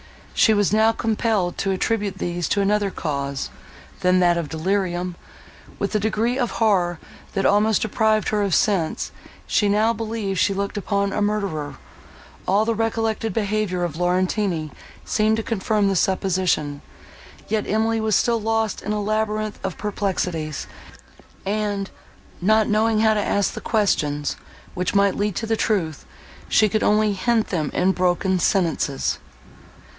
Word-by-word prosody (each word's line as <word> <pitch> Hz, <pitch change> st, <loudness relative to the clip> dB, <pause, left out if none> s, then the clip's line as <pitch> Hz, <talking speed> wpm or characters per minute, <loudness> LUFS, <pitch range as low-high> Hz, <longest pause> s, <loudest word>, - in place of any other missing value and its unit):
She 220 Hz, -, +4 dB
was 205 Hz, -1 st, +2 dB
now 220 Hz, +1 st, +5 dB
compelled 215 Hz, -5 st, 0 dB
to 195 Hz, -, 0 dB
attribute 200 Hz, 0 st, -1 dB
these 175 Hz, -2 st, -2 dB
to 200 Hz, -, +2 dB
another 205 Hz, 0 st, +2 dB
cause, 140 Hz, -6 st, -3 dB, 0.5 s
than 180 Hz, 0 st, +3 dB
that 175 Hz, -1 st, +4 dB
of 160 Hz, -4 st, -4 dB
delirium. 180 Hz, +1 st, -1 dB, 0.6 s
With -, -, -2 dB
a 215 Hz, -, +2 dB
degree 220 Hz, +4 st, 0 dB
of 245 Hz, -, 0 dB
horror, 185 Hz, -6 st, +2 dB, 0.4 s
that 195 Hz, -, 0 dB
almost 210 Hz, +1 st, +3 dB
deprived 220 Hz, -1 st, +1 dB
her 210 Hz, -1 st, +1 dB
of 200 Hz, -4 st, +1 dB
sense, 180 Hz, -7 st, +1 dB, 0.3 s
she 205 Hz, -2 st, +2 dB
now 215 Hz, +3 st, +3 dB
believed 220 Hz, -4 st, -3 dB
she 200 Hz, -, +2 dB
looked 200 Hz, +2 st, -3 dB
upon 200 Hz, -1 st, 0 dB
a -, -, -1 dB
murderer; 195 Hz, -9 st, -1 dB, 0.7 s
all 205 Hz, +3 st, +3 dB
the 230 Hz, -, +1 dB
recollected 225 Hz, 0 st, -1 dB
behaviour 210 Hz, -4 st, -1 dB
of 170 Hz, -4 st, -2 dB
Laurentini 180 Hz, -2 st, 0 dB, 0.3 s
seemed 215 Hz, 0 st, +2 dB
to 225 Hz, -, -2 dB
confirm 215 Hz, -2 st, 0 dB
the 195 Hz, -, +1 dB
supposition, 180 Hz, -6 st, 0 dB, 0.7 s
yet 215 Hz, -1 st, -1 dB
Emily 225 Hz, +1 st, +1 dB
was 220 Hz, -2 st, +2 dB
still 235 Hz, -2 st, +2 dB
lost 225 Hz, -1 st, 0 dB
in 210 Hz, -, -2 dB
a 210 Hz, -1 st, -1 dB
labyrinth 215 Hz, 0 st, -1 dB
of 190 Hz, -3 st, -3 dB
perplexities, 180 Hz, -7 st, -2 dB, 0.8 s
and, 205 Hz, -1 st, -2 dB, 0.5 s
not 215 Hz, +3 st, +3 dB
knowing 215 Hz, +1 st, +2 dB
how 220 Hz, -1 st, +4 dB
to 210 Hz, -, +1 dB
ask 200 Hz, -1 st, +1 dB
the -, -, -6 dB
questions, 150 Hz, -10 st, 0 dB, 0.4 s
which 180 Hz, +2 st, -2 dB
might 200 Hz, -1 st, +4 dB
lead 205 Hz, -2 st, -1 dB
to 225 Hz, -1 st, -1 dB
truth, 175 Hz, -9 st, -1 dB, 0.4 s
she 215 Hz, -, +5 dB
could 215 Hz, +1 st, 0 dB
only 210 Hz, 0 st, +3 dB
hint 220 Hz, +3 st, +1 dB
them 155 Hz, -6 st, -1 dB
in 185 Hz, +1 st, +3 dB
broken 185 Hz, 0 st, +1 dB
sentences. 165 Hz, -7 st, 0 dB
205 Hz, 150 wpm, -22 LUFS, 180-215 Hz, 0.8 s, now